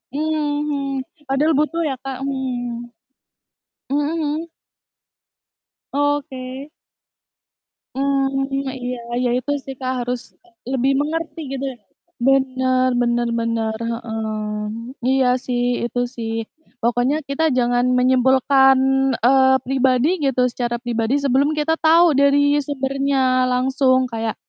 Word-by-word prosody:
Mhm. 290 Hz, -3 st, -1 dB, 0.2 s
Padahal 275 Hz, +4 st, +2 dB
butuh 330 Hz, +3 st, 0 dB
ya, 270 Hz, -, -2 dB
Kak, 270 Hz, -1 st, -5 dB
mhm. 245 Hz, -3 st, -3 dB, 1.0 s
Mhm 290 Hz, +1 st, +1 dB
mhm? 320 Hz, +1 st, -2 dB, 1.4 s
Oke. 280 Hz, -1 st, -2 dB, 1.3 s
Mmm, 270 Hz, 0 st, 0 dB
iya 275 Hz, -1 st, -2 dB
iya, 250 Hz, 0 st, -3 dB, 0.3 s
ya 245 Hz, -, +1 dB
itu 255 Hz, +3 st, -3 dB
sih, 270 Hz, -, -6 dB
Kak, 255 Hz, -1 st, -2 dB
harus, 245 Hz, 0 st, -2 dB, 0.3 s
eee, 355 Hz, -1 st, -27 dB, 0.2 s
lebih 265 Hz, 0 st, +1 dB
mengerti 325 Hz, +2 st, -3 dB
gitu 275 Hz, 0 st, -3 dB
ya. 250 Hz, -, -13 dB, 0.5 s
Benar 260 Hz, -1 st, +2 dB
benar 240 Hz, 0 st, +1 dB
benar, 230 Hz, -1 st, -1 dB, 0.2 s
heeh. 225 Hz, -1 st, -4 dB, 0.8 s
Iya 265 Hz, 0 st, +3 dB, 0.2 s
sih, 245 Hz, -1 st, -1 dB, 0.2 s
itu 240 Hz, +1 st, -3 dB, 0.2 s
sih. 225 Hz, -1 st, -4 dB, 0.5 s
Pokoknya 245 Hz, +4 st, +1 dB
kita 280 Hz, +3 st, -1 dB
jangan 245 Hz, 0 st, +2 dB
menyimpulkan, 265 Hz, +1 st, +4 dB, 0.5 s
eee, 265 Hz, +1 st, +5 dB
pribadi 260 Hz, 0 st, +2 dB, 0.2 s
gitu, 265 Hz, -2 st, +1 dB
secara 240 Hz, -1 st, -2 dB
pribadi, 235 Hz, 0 st, -1 dB
sebelum 275 Hz, +1 st, +3 dB
kita 310 Hz, +2 st, +1 dB
tahu 330 Hz, +2 st, +6 dB
dari 280 Hz, 0 st, +4 dB, 0.3 s
sumbernya 275 Hz, 0 st, -1 dB, 0.3 s
langsung 255 Hz, +1 st, +2 dB
kayak, 225 Hz, -1 st, -3 dB
265 Hz, 115 wpm, -20 LUFS, 250-280 Hz, 1.4 s, tahu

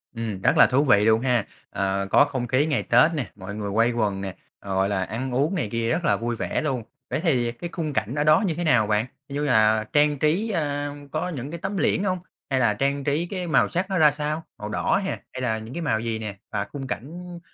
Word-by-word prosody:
Ừm, 110 Hz, -4 st, -4 dB
rất -, -, +3 dB
là -, -, +8 dB
thú 130 Hz, +3 st, +2 dB
vị 105 Hz, -7 st, +4 dB
luôn 110 Hz, 0 st, +4 dB
ha, 125 Hz, -4 st, +1 dB, 0.2 s
ờ, 95 Hz, 0 st, -1 dB
có -, -, +6 dB
không 130 Hz, -4 st, -3 dB
khí 130 Hz, +5 st, +2 dB
ngày 150 Hz, -4 st, 0 dB
Tết 165 Hz, -, +5 dB
nè, 140 Hz, -, -3 dB
mọi 100 Hz, +1 st, -7 dB
người 105 Hz, -1 st, -4 dB
quây 115 Hz, +4 st, +3 dB
quần 105 Hz, -5 st, -1 dB
nè, 95 Hz, -2 st, -5 dB, 0.3 s
gọi 95 Hz, 0 st, 0 dB
là, 95 Hz, -2 st, 0 dB
ăn 125 Hz, +6 st, -4 dB
uống 145 Hz, +9 st, +1 dB
này 145 Hz, -, -1 dB
kia 115 Hz, 0 st, -1 dB
rất 170 Hz, +1 st, 0 dB
là -, -, +3 dB
vui 120 Hz, +1 st, -2 dB
vẻ -, -, -2 dB
luôn. 135 Hz, -6 st, -2 dB, 0.3 s
vậy -, -, -1 dB
thì 125 Hz, -8 st, +2 dB
cái 170 Hz, +9 st, -7 dB
khung 155 Hz, -4 st, -3 dB
cảnh 120 Hz, +1 st, -1 dB
ở 145 Hz, -, +1 dB
đó 155 Hz, +6 st, +5 dB
như 165 Hz, -, 0 dB
thế 175 Hz, -, -3 dB
nào 125 Hz, -10 st, +3 dB
bạn? 105 Hz, +1 st, +1 dB, 0.2 s
Như 145 Hz, +1 st, -2 dB
là 110 Hz, -3 st, +3 dB
trang 145 Hz, -1 st, +3 dB
trí, 170 Hz, +10 st, +1 dB
ơ, 145 Hz, -6 st, -1 dB, 0.2 s
có 155 Hz, +4 st, -2 dB
những 145 Hz, -3 st, -5 dB
cái 170 Hz, -, -5 dB
tấm 195 Hz, +2 st, -3 dB
liễn 190 Hz, -, +2 dB
hông? 185 Hz, -2 st, 0 dB, 0.3 s
Hay 135 Hz, -1 st, +1 dB
là 115 Hz, -4 st, +3 dB
trang 140 Hz, +5 st, -1 dB
trí 145 Hz, +4 st, 0 dB
cái 180 Hz, 0 st, -4 dB
màu 155 Hz, -5 st, +3 dB
sắc 185 Hz, +2 st, -2 dB
nó 190 Hz, -, 0 dB
ra 155 Hz, -3 st, +6 dB
sao, 150 Hz, +2 st, -3 dB
màu 105 Hz, -, -6 dB
đỏ 105 Hz, -, +1 dB
hè, -, -, -1 dB, 0.2 s
hay 130 Hz, -, -5 dB
là 110 Hz, -3 st, 0 dB
những 110 Hz, +3 st, -9 dB
cái 170 Hz, -, -4 dB
màu 110 Hz, -9 st, +1 dB
gì 115 Hz, -1 st, -2 dB
nè? 105 Hz, -3 st, -6 dB
Và 100 Hz, -1 st, -1 dB
khung 135 Hz, -2 st, -5 dB
cảnh 175 Hz, +7 st, -6 dB
130 Hz, 255 wpm, -24 LUFS, 110-155 Hz, 0.3 s, là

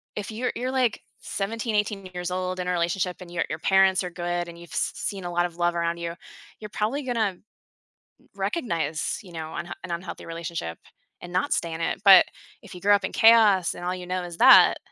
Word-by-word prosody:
if 210 Hz, +1 st, -5 dB
you're 245 Hz, +3 st, -2 dB
you're, 255 Hz, +2 st, -2 dB
like, 255 Hz, -4 st, +1 dB, 0.2 s
17, 220 Hz, +2 st, -3 dB
18 205 Hz, -2 st, -1 dB
years 180 Hz, 0 st, -4 dB
old 185 Hz, 0 st, -3 dB
in 180 Hz, -, -3 dB
a -, -, +1 dB
relationship, 175 Hz, +1 st, -1 dB
and 175 Hz, -1 st, -10 dB
your 175 Hz, -, -1 dB
your 155 Hz, -, -4 dB
parents 190 Hz, +1 st, +3 dB
are 180 Hz, -, -4 dB
good, 175 Hz, 0 st, -3 dB
and 170 Hz, 0 st, -10 dB
you've 170 Hz, -1 st, -13 dB
s -, -, -1 dB
seen 195 Hz, -2 st, -4 dB
a 175 Hz, -, -4 dB
lot 175 Hz, 0 st, +1 dB
of 170 Hz, -1 st, -7 dB
love 175 Hz, 0 st, +1 dB
around 170 Hz, 0 st, -1 dB
you, 170 Hz, 0 st, -4 dB, 0.5 s
you're 210 Hz, -, -8 dB
probably 220 Hz, +8 st, -2 dB
gonna 245 Hz, -3 st, -1 dB
r 200 Hz, -4 st, 0 dB, 1.0 s
recognize, 165 Hz, -, -2 dB
you 185 Hz, -, -14 dB
know, 160 Hz, -1 st, -6 dB
unh 170 Hz, +1 st, -6 dB
an 185 Hz, -, -7 dB
unhealthy 170 Hz, +1 st, -6 dB
relationship 165 Hz, -, -5 dB, 0.4 s
and 175 Hz, 0 st, -9 dB
not 185 Hz, -, +1 dB
stay 170 Hz, -1 st, -2 dB
in 160 Hz, -, -5 dB
it, 165 Hz, -, -2 dB
but 195 Hz, -2 st, +9 dB, 0.4 s
if -, -, -13 dB
you 180 Hz, -, -10 dB
grew 205 Hz, +1 st, +4 dB
up 200 Hz, -1 st, +3 dB
in -, -, -4 dB
chaos 220 Hz, -6 st, +5 dB
and -, -, -9 dB
all 180 Hz, -, -1 dB
you 180 Hz, -1 st, -8 dB
know 185 Hz, 0 st, -2 dB
is 175 Hz, -1 st, -8 dB
that -, -, +8 dB
180 Hz, 225 wpm, -25 LUFS, 170-205 Hz, 1.0 s, but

